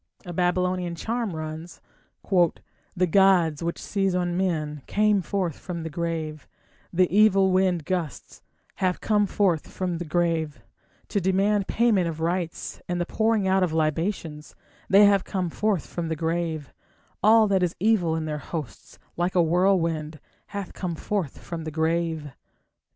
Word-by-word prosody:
A 175 - -6
Babylonian 180 0 0
charm 225 0 -3
runs: 155 +2 -7 0.5
The 180 0 0
gods 175 -4 +4
which 170 0 -2
seize 195 -2 -1
on 175 -1 0
men 155 -6 -1
Came 210 -1 +2
forth 180 -3 -2
from 170 -3 -5
the 160 - -5
grave; 160 -2 -4 0.4
The 185 +1 +3
evil 195 -3 +5
wind 185 -4 +2
gusts 175 -6 -4 0.4
Have 185 -1 0
come 210 -2 +2
forth 185 -6 +1
from 180 -3 -3
the 175 - -4
grave, 160 -2 -1 0.5
To 205 - 0
demand 195 +2 +2
payment 215 -7 +2
of 160 -1 -4
rites 170 +1 -3
and 175 0 -2
the 175 - 0
pouring 220 0 +1
out 190 0 +3
of 180 -3 +1
libations 160 0 -2 0.3
They 200 +1 +7
have 200 -2 +4
come 180 -3 -3
forth 210 -3 0
from 170 -1 -4
the 160 - -2
grave; 160 -2 -2 0.5
All 220 +1 +6
that 190 -2 +2
is 180 -2 0
evil 185 -5 +2
in 160 -1 -2
their 150 -1 -3
hosts, 150 -4 -7 0.2
like 175 +2 0
a 175 - +5
whirlwind, 165 -3 +1 0.3
Hath 200 -2 -6
come 175 -3 -4
forth 185 -4 -3
from 165 -2 -7
the 155 - -4
grave. 160 -1 -1
175 Hz, 155 wpm, -25 LUFS, 160-195 Hz, 0.5 s, They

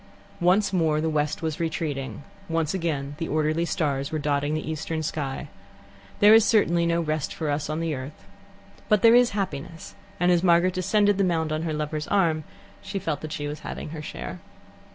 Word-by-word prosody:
Once 185 +3 +3
more 160 -4 +2
the 160 +1 0
west 150 +1 -1
was 160 -2 -2
retreating, 150 -5 -3 0.3
once 165 0 0
again 150 -6 -2
the 165 - -2
orderly 155 +2 +1
stars 140 -5 -1
were 155 - -1
dotting 145 0 0
the 155 - -4
eastern 160 +1 -3
sky. 145 -2 -3 0.7
There 205 +1 +8
is 225 0 +8
certainly 175 -7 +3
no 170 0 +1
rest 155 -2 -2
for 155 -3 -2
us 145 +1 -2
on 155 +1 -2
the 165 -2 -1
earth. 135 +2 -8 0.6
But 210 -2 +3
there 230 0 +8
is 245 0 +6
happiness, 165 -4 -4 0.3
and 175 +1 +3
as 175 -1 +3
Margaret 175 0 +4
descended 200 +2 +2
the - - +4
mound 165 -4 0
on 155 - -1
her 165 -1 -2
lover's 150 0 -3
arm, 165 -6 +1 0.4
she 195 0 -5
felt 160 -5 -2
that 155 - -6
she 145 -1 -3
was 150 +1 -5
having - - -6
her 155 0 -6
share. - - -7
160 Hz, 195 wpm, -25 LUFS, 150-175 Hz, 0.7 s, There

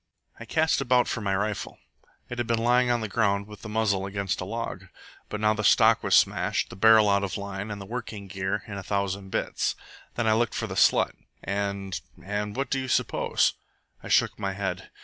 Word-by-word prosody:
"I - - -8
cast 160 -2 +1
about 125 -1 +3
for 115 - -2
my 100 -2 0
rifle. 105 +1 -3 0.5
It 125 - -6
had 120 - -1
been 115 -1 +1
lying 125 +2 +3
on 120 -1 +1
the 110 - -2
ground 100 -1 +1
with 105 -1 -12
the 105 - -8
muzzle 105 -3 0
against 100 -1 -2
a - - -3
log; 115 +4 -5 0.4
but 105 - -4
now 105 0 +3
the 105 0 -3
stock 110 +2 +5
was - - +3
smashed, - - +2
the - - -8
barrel 110 +2 +6
out 100 0 +3
of 95 0 -3
line, 100 +1 -5
and 105 -1 -5
the 100 - -8
working 110 -2 -6
gear 95 +1 -3
in 100 -2 -6
a - - -8
thousand 100 0 -2
bits. - - -1 0.4
Then 120 - -1
I 110 - +4
looked 115 0 +1
for - - -2
the - - -5
slut, - - +4 0.3
and 100 -1 -3 0.2
and 105 +1 -3
what 135 +2 -2
do 135 - +1
you 130 - -4
suppose?" - - +1 0.5
I - - -9
shook - - +2
my 100 -2 -2
head. 95 -1 -4
105 Hz, 215 wpm, -26 LUFS, 100-115 Hz, 0.5 s, barrel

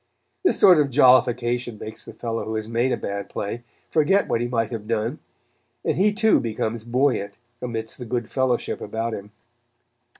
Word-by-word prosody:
This 370 - +2
sort 180 -4 +7
of 145 -2 +2
jollification 125 -3 +3
makes 110 +1 -8
the - - -10
fellow 115 -1 -3
who 110 - -4
has 110 0 -3
made 120 +3 +1
a - - +1
bad 100 0 -4
play 105 +4 -4 0.3
forget 165 +6 +3
what 115 - 0
he 120 - 0
might 115 -2 -1
have 110 -3 -5
done, 115 +5 -1 0.7
and - - +1
he 205 +3 +3
too 220 +1 +3
becomes 110 -1 -3
buoyant 120 -4 0 0.3
amidst 115 -2 -5
the 125 - -6
good 120 -1 -2
fellowship 130 -3 -1
about 115 +2 -3
him. 100 0 -7
120 Hz, 175 wpm, -23 LUFS, 110-130 Hz, 0.7 s, sort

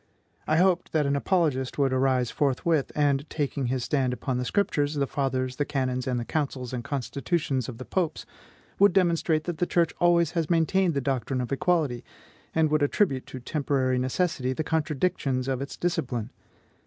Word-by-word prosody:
I 155 - +3
hoped 180 0 +2
that 155 -2 +2
an 140 0 +1
apologist 140 -5 0
would 135 -2 +2
arise 130 -2 +2
forthwith, 145 +2 +1
and, 145 -1 +1
taking 140 -3 -2
his 130 0 -1
stand 130 -3 0
upon 125 +1 -2
the 125 - -2
Scriptures, 145 -4 0
the 140 -1 +1
Fathers, 130 -2 -2
the 145 - +1
canons, 130 -3 -2
and 125 -2 0
the 120 - -4
councils 135 -5 -3
and 120 -2 -3
constitutions 140 0 -2
of 120 - -7
the 130 - -8
Popes, 175 -4 -2 0.5
would 200 -2 +6
demonstrate 170 -4 +2
that 170 -1 -4
the 175 - +1
church 170 -2 +2
always 170 -2 +4
has 165 -3 -1
maintained 170 +1 +2
the 140 - +1
doctrine 130 -1 -1
of 125 +1 -3
equality, 145 -4 +1 0.5
and 160 -1 +3
would 155 0 +2
attribute 145 -2 +1
to 130 - -7
temporary 130 -1 0
necessity 130 0 0
the 155 - -2
contradictions 150 -4 -1
of 135 -1 -1
its 140 - -6
discipline. 125 -9 -2
140 Hz, 180 wpm, -26 LUFS, 130-165 Hz, 0.5 s, would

